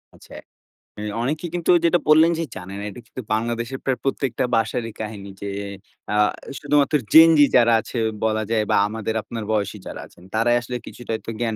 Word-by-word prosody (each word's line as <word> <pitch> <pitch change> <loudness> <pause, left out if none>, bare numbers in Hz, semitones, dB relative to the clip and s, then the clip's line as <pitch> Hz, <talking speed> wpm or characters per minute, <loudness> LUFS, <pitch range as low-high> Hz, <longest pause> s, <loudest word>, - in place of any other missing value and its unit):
আচ্ছা, - - -16 0.7
এ - - -5 0.2
অনেকে 150 +7 -2
কিন্তু 175 0 +1
যেটা 175 +1 +4
বললেন 160 +2 +6
যে, 165 - 0
"জানে 95 +1 -8
না।" - - -6
এটা 100 - -10
কিন্তু 130 - -7
বাংলাদেশের 115 +3 -2
প্রায় 130 -2 -1
প্রত্যেকটা 135 -3 -1
বাসারই 115 0 -1
কাহিনী 105 -2 -6
যে 100 - -4 0.6
আ - - +1 0.4
শুধুমাত্র 145 0 +2 0.2
Gen 160 +1 +9
Z - - +3 0.2
যারা 120 -1 +5
আছে 120 - -7 0.3
বলা 110 0 +1
যায় 110 -2 +2
বা - - +4
আমাদের 110 +1 -4
আপনার 115 -2 -6
বয়সী 105 -1 -1
যারা - - -7
আছেন, 90 - -20
তারাই 120 +2 +3
আসলে 125 +1 -6
কিছুটা 120 -2 -8
একটা 115 - -7
জ্ঞান 115 -2 -1
115 Hz, 185 wpm, -22 LUFS, 110-135 Hz, 0.7 s, Gen